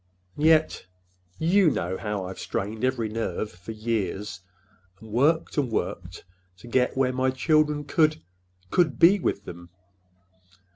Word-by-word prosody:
And 150 - -2
yet—you 95 - +1
know 90 - -2
how 105 -2 -3
I've 95 0 -8
strained 110 +1 -4
every 130 -3 0
nerve 110 -1 -3
for 90 +5 -10
years, 105 -3 -3 0.6
and 110 -1 -13
worked 150 +7 +2
and 135 -4 0
worked 90 -3 -4 0.3
to 120 - -14
get 125 +2 +1
where 130 -1 +2
my 130 +1 +1
children 150 +2 +1
could—could 90 - -1
be 185 - +6
with 100 - -2
them!" 85 0 -10
115 Hz, 130 wpm, -25 LUFS, 90-145 Hz, 0.6 s, be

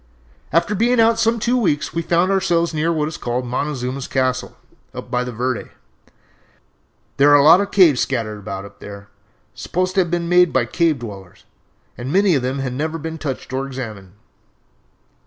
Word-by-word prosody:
"After 170 +6 +1
being 235 +4 +2
out 225 0 +4
some 230 +1 +2
two 240 +3 0
weeks 180 -12 0
we 170 - -1
found 175 +3 +1
ourselves 175 -3 +1
near 160 +2 0
what 155 -2 0
is 155 - -6
called 125 +1 -3
'Montezuma's 130 0 -3
Castle,' 130 -1 -1 0.4
up - - -8
by 125 0 0
the 125 - -5
Verde. 125 +1 -3 1.5
There 140 +1 +5
are 145 - +7
a 140 - +4
lot 165 +6 +7
of 200 - -3
caves 170 -11 +5
scattered 115 -5 -2
about 95 -1 -6
up 100 - -15
there, 100 0 -10 0.4
supposed 185 +1 -2
to 190 - +3
have 175 - -2
been 170 0 -1
made 180 0 +4
by 130 - +2
the 115 - -10
Cave 165 -4 +2
Dwellers, 100 -6 -10 0.6
and 125 +3 -4
many 195 +1 +3
of 140 - +1
them 130 +2 -2
had 130 -2 -3
never 155 +5 -3
been 160 +1 -6
touched 135 -3 -5
or 135 +1 -2
examined. 110 -8 -8
145 Hz, 190 wpm, -20 LUFS, 125-175 Hz, 1.5 s, are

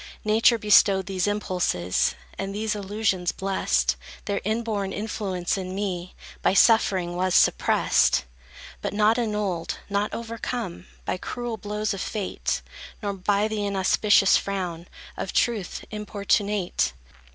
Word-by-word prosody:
Nature 225 +2 +4
bestowed 200 -3 +5
these 185 +1 -1
impulses, 180 - 0 0.2
And 195 0 -4
these 215 +1 -1
illusions 200 -3 -1
blest; 195 0 0 0.3
Their 200 -1 -1
inborn 215 -2 -1
influence, 195 -3 -2
in 185 0 -5
me, 185 -3 -3 0.3
By - - +2
suffering 190 -6 +4
was 185 0 +1
suppressed; 70 - +3 0.6
But - - -3
not 215 +3 +4
annulled, 210 -7 -2
not 205 +1 0
overcome 230 -5 -5 0.2
By - - -1
cruel 240 +4 -4
blows 210 +1 -2
of 195 - -5
Fate; 205 -4 -2 0.4
Nor 200 -1 -1
by 200 +2 +1
the 215 -1 -2
inauspicious 200 0 +4
frown 180 -4 -4 0.3
Of 190 - -4
Truth, 220 -6 0
importunate! 205 - 0
200 Hz, 120 wpm, -25 LUFS, 185-215 Hz, 0.6 s, bestowed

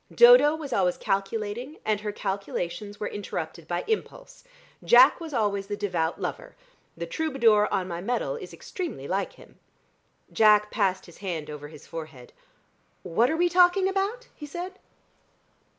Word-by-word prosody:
Dodo 475 -11 +7
was 290 -5 -6
always 180 -4 +1
calculating, 210 +7 -3
and 215 -1 +1
her 210 0 -3
calculations 200 0 -4
were 210 - -3
interrupted 170 -5 -6
by 175 0 -2
impulse. 450 +3 -4 0.4
Jack 255 +7 +7
was 330 -2 -7
always 205 -5 -1
the 205 0 -4
devout 175 -5 -1
lover. - - -5 0.4
The 170 - -4
troubadour 225 - +2
on 185 - 0
my 170 -1 -5
medal 245 - -1
is 465 - -8
extremely 320 - -6
like 195 +2 -2
him." - - -18 0.7
Jack 210 -1 +5
passed 190 -3 0
his 170 - -16
hand 170 -6 -4
over 145 0 -8
his 150 -1 -14
forehead. 155 -7 -9 0.7
"What 225 +9 +2
are 320 - 0
we 350 +1 +3
talking 360 +2 +4
about?" 400 +6 -2
he 295 - -9
said. 360 +5 -7
210 Hz, 150 wpm, -26 LUFS, -, 0.7 s, Dodo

